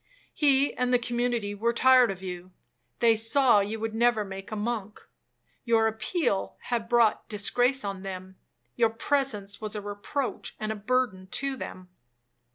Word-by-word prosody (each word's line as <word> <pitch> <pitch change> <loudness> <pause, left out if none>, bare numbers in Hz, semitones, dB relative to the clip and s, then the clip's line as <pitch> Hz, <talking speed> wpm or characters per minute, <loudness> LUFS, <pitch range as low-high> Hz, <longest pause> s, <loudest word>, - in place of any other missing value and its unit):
He 280 -2 +3
and 250 0 -1
the 250 - +5
community 240 -3 -1
were 230 +3 0
tired 255 0 +5
of 190 -1 -6
you, 180 -1 -6 0.5
they 230 -1 +5
saw 225 +1 +4
you 210 +2 -2
would 225 0 -3
never 225 -2 +2
make 195 +1 -8
a - - -3
monk,—your 225 +1 -3
appeal 220 - -1
had 230 -2 -3
brought 235 -3 +3
disgrace 245 +5 +1
on 195 -1 -4
them, 190 -1 -7 0.4
your 230 - +3
presence 225 -4 -1
was 215 0 -4
a - - -2
reproach 205 +7 -4
and 215 0 -2
a - - -3
burden 210 -3 -1
to 275 -1 -1
them. 185 -7 -8
225 Hz, 155 wpm, -27 LUFS, 205-245 Hz, 0.5 s, the